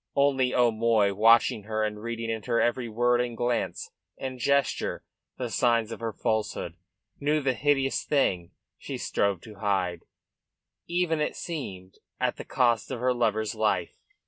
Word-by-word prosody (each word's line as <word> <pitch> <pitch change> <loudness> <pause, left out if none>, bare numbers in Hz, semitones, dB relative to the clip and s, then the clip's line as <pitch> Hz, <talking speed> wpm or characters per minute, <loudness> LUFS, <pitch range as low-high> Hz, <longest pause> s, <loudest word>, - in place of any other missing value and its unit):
Only 135 -2 +3
O'Moy, 115 -4 +3
watching 110 0 +4
her 110 0 -1
and 105 -1 -3
reading 115 0 -3
in 110 -1 -3
her 115 +1 0
every 120 0 0
word 120 +2 +2
and 120 -2 -3
glance 120 -1 -1 0.3
and 130 -1 -5
gesture 140 +3 +1 0.3
the 125 -3 -4
signs 115 -2 +2
of - - -6
her 115 -1 -3
falsehood, 110 -6 -2 0.5
knew 150 +2 +2
the 135 -3 +1
hideous 135 0 +1
thing 95 - +1 0.3
she - - -5
strove 100 -3 0
to 105 -2 -12
hide, 95 -4 -1 0.8
even, 170 -3 0
it 150 - -1
seemed, 95 - -6 0.2
at - - 0
the - - -6
cost 120 -4 +1
of 130 - -4
her 125 +1 +2
lover's 110 -3 0
life. 105 -6 0
115 Hz, 155 wpm, -27 LUFS, 110-130 Hz, 0.8 s, watching